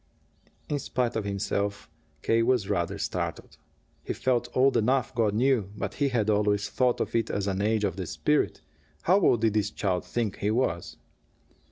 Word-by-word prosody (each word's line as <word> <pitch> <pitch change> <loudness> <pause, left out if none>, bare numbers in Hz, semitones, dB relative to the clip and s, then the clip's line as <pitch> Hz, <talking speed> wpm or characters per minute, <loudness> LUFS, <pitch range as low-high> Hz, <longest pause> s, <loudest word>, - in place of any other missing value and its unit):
In 145 - -1
spite 125 -2 -1
of 110 -2 -2
himself, 100 0 -2 0.4
K. 115 0 +3
was 115 -4 +2
rather 85 -1 -1
startled. - - -4 0.5
He - - -3
felt 125 -2 0
old 135 +1 +4
enough, 125 +3 +1
God 110 -4 +1
knew, 120 -4 +2
but - - -3
he 140 -1 0
had 115 -5 0
always 105 -1 +1
thought 125 -2 +1
of - - -2
it 115 -1 +1
as 100 - -1
an 100 -1 -1
age 110 +1 +1
of 95 -3 -1
the 95 -3 -4
spirit. 150 - 0 0.4
How 185 +4 +4
old 120 - +3
did 110 -2 +2
this 105 -2 +1
child 90 -3 -1
think 115 -5 -2
he 105 - -1
was? 110 -7 -1
110 Hz, 180 wpm, -27 LUFS, 100-125 Hz, 0.5 s, old